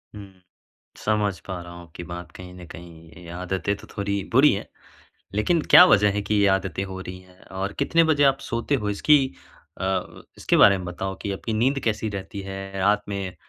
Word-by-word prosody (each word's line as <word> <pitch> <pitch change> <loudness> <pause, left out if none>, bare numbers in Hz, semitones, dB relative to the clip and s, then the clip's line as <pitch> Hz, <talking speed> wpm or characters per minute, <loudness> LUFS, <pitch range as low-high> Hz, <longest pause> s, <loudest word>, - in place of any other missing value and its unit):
हुँ। 100 -2 -10 0.7
समझ 105 -3 0
पा 95 -2 -5
रहा 85 0 -11
हुँ 85 0 -10
आपकी 85 +1 -11
बात 85 0 -8
कहीं 90 0 -11
न 90 -1 -11
कहीं 85 -1 -13
ये 85 -1 -14
आदतें 95 +3 -2
तो - - -14
थोड़ी 100 -1 -2
बुरी 135 +5 +6
हैं। 100 - -4 0.7
लेकिन 160 +10 +2
क्या 180 - +11
वज़ह 105 - +4
है 105 - -1
कि 105 +1 -1
ये 100 0 +3
आदतें 95 -1 0
हो 95 0 -7
रही 95 0 -8
हैं 90 0 -21 0.2
और 100 +1 -2
कितने 165 0 +3
बजे 150 -3 +2
आप 135 0 +3
सोते 130 +2 -1
हो 105 -5 -2
इसकी 145 +9 +4 0.6
अ, - - -3 0.5
इसके - - +1
बारे 100 -1 +7
में 90 - -7
बताओ 95 +2 -5
कि 100 - -3
आपकी 110 +3 -4
नींद 130 +5 +1
कैसी 110 -1 -1
रहती 100 0 -6
है, 95 0 -7
रात 105 +2 +2
में 95 -3 -4
100 Hz, 205 wpm, -24 LUFS, 90-105 Hz, 0.7 s, क्या